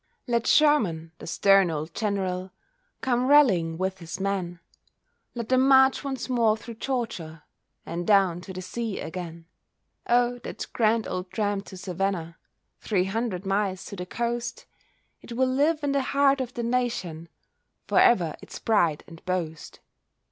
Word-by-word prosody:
Let 235 Hz, -2 st, 0 dB
Sherman, 210 Hz, -, +3 dB
the -, -, -9 dB
stern 195 Hz, +1 st, +4 dB
old 160 Hz, +1 st, -4 dB
General, 190 Hz, -3 st, -2 dB, 0.5 s
Come 250 Hz, 0 st, +1 dB
rallying 195 Hz, -, +4 dB
with 190 Hz, +1 st, -2 dB
his 170 Hz, +1 st, -7 dB
men; 190 Hz, -3 st, -2 dB, 0.8 s
Let 235 Hz, -2 st, -5 dB
them 260 Hz, +1 st, +4 dB
march 265 Hz, 0 st, +5 dB
once 270 Hz, -3 st, -4 dB
more 230 Hz, -4 st, +2 dB
through 230 Hz, +2 st, -9 dB
Georgia 180 Hz, -, -3 dB, 0.4 s
And 170 Hz, +1 st, -4 dB
down 190 Hz, -4 st, +4 dB
to 190 Hz, -, -9 dB
the 185 Hz, 0 st, -6 dB
sea 220 Hz, +3 st, -4 dB
again. 170 Hz, -1 st, -7 dB, 0.6 s
Oh! 245 Hz, 0 st, +3 dB
that -, -, -6 dB
grand 225 Hz, -1 st, +2 dB
old 185 Hz, 0 st, -4 dB
tramp 205 Hz, +1 st, -1 dB
to 190 Hz, -, -10 dB
Savannah, 180 Hz, -3 st, -3 dB, 0.4 s
Three 190 Hz, -4 st, 0 dB
hundred 200 Hz, -2 st, -2 dB
miles 195 Hz, -1 st, -1 dB
to 200 Hz, -, -7 dB
the 180 Hz, -1 st, -6 dB
coast, 235 Hz, +2 st, -3 dB, 0.6 s
It 240 Hz, -, -9 dB
will 260 Hz, +2 st, +2 dB
live 295 Hz, +4 st, +1 dB
in 285 Hz, -, +1 dB
the 280 Hz, 0 st, +2 dB
heart 275 Hz, 0 st, +2 dB
of 250 Hz, -1 st, -5 dB
the 235 Hz, -, -3 dB
nation, 230 Hz, -10 st, -2 dB, 0.6 s
For -, -, +3 dB
ever 175 Hz, -9 st, +4 dB
its -, -, -9 dB
pride 170 Hz, -9 st, +1 dB
and 165 Hz, -2 st, -14 dB
boast. 170 Hz, -4 st, -4 dB
200 Hz, 155 wpm, -26 LUFS, 180-240 Hz, 0.8 s, march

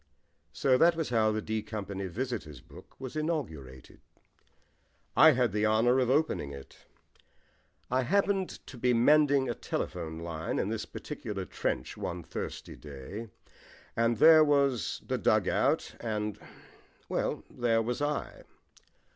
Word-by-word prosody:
So 130 Hz, -2 st, +2 dB
that 170 Hz, +1 st, +5 dB
was 160 Hz, -4 st, -2 dB
how 110 Hz, -2 st, +3 dB
the 110 Hz, 0 st, -2 dB
D 110 Hz, 0 st, -2 dB
Company 100 Hz, -3 st, -5 dB
Visitors' 105 Hz, -, -4 dB
Book -, -, -16 dB
was 130 Hz, 0 st, -7 dB
inaugurated. 90 Hz, -, -4 dB, 1.1 s
I 160 Hz, 0 st, +8 dB
had 125 Hz, -3 st, +1 dB
the 105 Hz, +2 st, +1 dB
honour 120 Hz, +4 st, +3 dB
of 125 Hz, -2 st, +1 dB
opening 140 Hz, -, +1 dB
it. 70 Hz, -1 st, -12 dB, 1.1 s
I 130 Hz, +1 st, +3 dB
happened 195 Hz, +5 st, 0 dB
to 125 Hz, -, -11 dB
be 125 Hz, 0 st, +2 dB
mending 140 Hz, +2 st, +4 dB
a 120 Hz, -, -1 dB
telephone 80 Hz, -6 st, -4 dB
line 80 Hz, -1 st, -4 dB
in -, -, 0 dB
this -, -, -3 dB
particular 95 Hz, -3 st, -6 dB
trench -, -, -3 dB
one -, -, -4 dB
thirsty -, -, -6 dB
day, 75 Hz, -, -8 dB, 0.7 s
and 115 Hz, 0 st, +2 dB
there 160 Hz, +5 st, +8 dB
was 140 Hz, -5 st, +1 dB
the -, -, -2 dB
dug -, -, +2 dB
out, -, -, +1 dB
and 105 Hz, -3 st, -3 dB, 0.7 s
well, -, -, -2 dB
there 115 Hz, -2 st, +1 dB
was 125 Hz, +4 st, -3 dB
I. 145 Hz, 0 st, -2 dB
115 Hz, 140 wpm, -30 LUFS, 105-140 Hz, 1.1 s, I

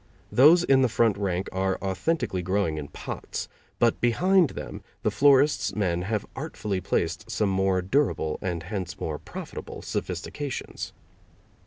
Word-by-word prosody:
Those 160 Hz, +7 st, +7 dB
in 135 Hz, -5 st, +4 dB
the 130 Hz, -, +3 dB
front 115 Hz, -2 st, +3 dB
rank 95 Hz, -2 st, -1 dB
are 95 Hz, 0 st, 0 dB
authentically 95 Hz, -, -1 dB
growing 90 Hz, -3 st, 0 dB
in 70 Hz, -, -6 dB
pots, -, -, -6 dB, 0.3 s
but 115 Hz, -1 st, +2 dB
behind 175 Hz, +8 st, +4 dB
them -, -, -6 dB, 0.2 s
the -, -, +2 dB
florist's 145 Hz, +1 st, +4 dB
men 90 Hz, -4 st, 0 dB
have 105 Hz, +3 st, -2 dB
artfully 100 Hz, -3 st, -3 dB
placed -, -, -1 dB
some 105 Hz, -2 st, +1 dB
more 95 Hz, -1 st, +1 dB
durable, 95 Hz, -, +1 dB
and 85 Hz, -3 st, -2 dB
hence 95 Hz, -1 st, -5 dB
more 75 Hz, -2 st, -3 dB
profitable, -, -, -8 dB
sophistications. 130 Hz, -, -4 dB
100 Hz, 140 wpm, -26 LUFS, 90-130 Hz, 0.3 s, Those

